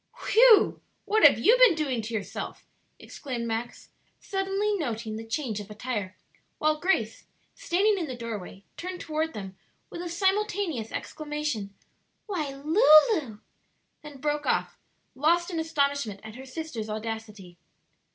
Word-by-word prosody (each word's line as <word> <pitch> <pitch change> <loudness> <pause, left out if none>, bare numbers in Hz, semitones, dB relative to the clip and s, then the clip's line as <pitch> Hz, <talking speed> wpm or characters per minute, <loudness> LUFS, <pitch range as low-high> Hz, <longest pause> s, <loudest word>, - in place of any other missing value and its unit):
"Whew! 460 -1 +6 0.2
what 435 +1 +2
have - - +8
you 465 - +5
been - - +7
doing 275 -7 -1
to 225 +2 -7
yourself?" 210 +1 -5 0.3
exclaimed 250 -5 -6
Max, 230 +1 -4 0.3
suddenly 390 +2 -1
noting 230 - -3
the 220 - -6
change 225 -2 -3
of 205 0 -9
attire, 210 -3 -4 0.4
while 305 0 +1
Grace, 225 - 0 0.3
standing 415 -3 +1
in 330 - -3
the 255 - -5
doorway, 210 -5 -7
turned 365 +1 -5
toward 315 +1 -2
them 195 -2 -7 0.4
with 340 - -6
a 350 - -5
simultaneous 380 - 0
exclamation, 295 -10 -4 0.5
"Why, 350 -9 -3
Lulu 305 - +4 0.3
" - - -47
then 295 -2 -11
broke 295 +1 -1
off, - - 0 0.4
lost 340 +6 +2
in 330 - -2
astonishment 280 -9 -1
at 220 0 -9
her 260 +3 -10
sister's 255 -6 -6
audacity. 215 -4 -6
290 Hz, 140 wpm, -27 LUFS, 225-345 Hz, 0.5 s, have